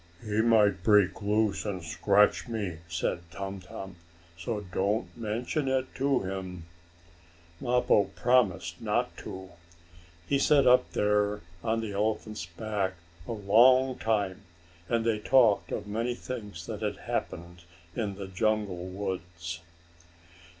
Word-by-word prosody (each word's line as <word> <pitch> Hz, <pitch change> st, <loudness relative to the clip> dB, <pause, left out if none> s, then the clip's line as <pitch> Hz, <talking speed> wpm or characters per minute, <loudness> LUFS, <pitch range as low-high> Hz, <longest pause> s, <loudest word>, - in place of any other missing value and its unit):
"He 105 Hz, +1 st, +1 dB
might 105 Hz, -4 st, +4 dB
break 105 Hz, 0 st, +4 dB
loose, 105 Hz, 0 st, +1 dB
and 95 Hz, -4 st, -4 dB
scratch 100 Hz, +7 st, +3 dB
me," 100 Hz, -8 st, -3 dB
said 85 Hz, 0 st, -2 dB
Tum 95 Hz, +1 st, -5 dB
Tum. 95 Hz, 0 st, -9 dB, 0.4 s
"So 105 Hz, +5 st, -3 dB
don't 100 Hz, +3 st, -1 dB
mention 120 Hz, +5 st, -2 dB
it 130 Hz, 0 st, 0 dB
to 135 Hz, 0 st, +1 dB
him." 95 Hz, -3 st, -5 dB, 0.9 s
Mappo 125 Hz, -5 st, +3 dB
promised 120 Hz, -8 st, +2 dB
not -, -, 0 dB
to. 95 Hz, 0 st, -8 dB, 0.8 s
He 140 Hz, -, +2 dB
sat 140 Hz, 0 st, +4 dB
up 125 Hz, 0 st, +5 dB
there 105 Hz, 0 st, +1 dB, 0.2 s
on 115 Hz, 0 st, 0 dB
the 110 Hz, -2 st, -4 dB
elephant's 105 Hz, -2 st, -2 dB
back 100 Hz, +1 st, -2 dB, 0.3 s
a -, -, -4 dB
long 125 Hz, +5 st, +5 dB
time, 100 Hz, -4 st, 0 dB, 0.5 s
and 115 Hz, -1 st, +1 dB
they 110 Hz, -2 st, +1 dB
talked 115 Hz, -2 st, +4 dB
of -, -, -3 dB
many 115 Hz, +4 st, -2 dB
things 105 Hz, -10 st, -7 dB
that 110 Hz, +1 st, -6 dB
had 105 Hz, -2 st, -2 dB
happened 85 Hz, +1 st, -4 dB, 0.3 s
in 105 Hz, -4 st, -2 dB
the 100 Hz, 0 st, -6 dB
jungle 100 Hz, -2 st, -1 dB
woods. 90 Hz, -3 st, -5 dB
105 Hz, 130 wpm, -29 LUFS, 95-115 Hz, 0.9 s, up